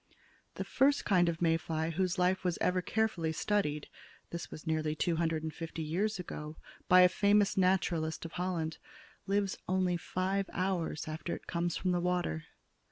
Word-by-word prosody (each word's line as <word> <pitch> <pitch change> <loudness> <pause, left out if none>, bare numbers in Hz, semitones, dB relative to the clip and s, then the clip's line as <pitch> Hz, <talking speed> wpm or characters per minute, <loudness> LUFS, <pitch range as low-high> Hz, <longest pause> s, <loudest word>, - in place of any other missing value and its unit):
The - - -3
first 280 +1 +2
kind 180 -4 +4
of 170 +1 -2
May 165 -1 +4
fly 160 0 -2
whose 180 +1 0
life 180 +1 +2
was 180 -2 0
ever 185 0 +2
carefully 185 -6 0
studied 155 -4 0 0.4
this 170 -1 -5
was 155 - -9
nearly 155 -1 0
two 165 +1 0
hundred 165 -1 0
and 160 -1 -4
fifty 165 0 -5
years 195 +8 0
ago, 155 -3 -6 0.3
by 185 0 +8
a 180 - +9
famous 205 +2 +3
naturalist 175 -4 +1
of 165 - -6
Holland 175 -3 -2 0.5
lives 200 0 0
only 185 -1 +1
five 190 +3 -1
hours 180 -5 -1
after 155 +2 -3
it - - -12
comes 170 0 -1
from 185 - 0
the 175 -1 +1
water. 175 - -1
175 Hz, 170 wpm, -32 LUFS, 160-185 Hz, 0.5 s, a